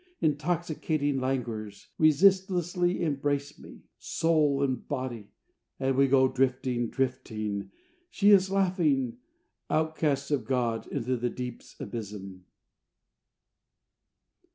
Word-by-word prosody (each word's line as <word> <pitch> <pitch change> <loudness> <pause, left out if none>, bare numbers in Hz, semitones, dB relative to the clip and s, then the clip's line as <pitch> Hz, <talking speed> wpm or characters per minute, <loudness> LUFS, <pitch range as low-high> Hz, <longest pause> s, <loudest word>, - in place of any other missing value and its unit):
Intoxicating 155 -2 0
languors 115 -6 -3
Resistlessly 180 +2 +3
embrace 145 -1 -1
me, - - -13 0.2
soul 150 -4 +1
and 130 -2 -2
body; 125 -7 -4 0.5
And 135 0 +1
we 135 +1 +4
go 130 0 +5
drifting, 130 -2 0
drifting 110 -6 -3 0.4
she 205 0 +4
is 190 -2 +6
laughing 160 - +1 0.5
Outcasts 155 -3 0
of 135 -6 0
God, 120 -2 -1
into 130 -2 -2
the 120 +1 -1
deep's 125 -1 -8
abysm. 100 -5 -7
135 Hz, 95 wpm, -28 LUFS, 125-155 Hz, 0.5 s, is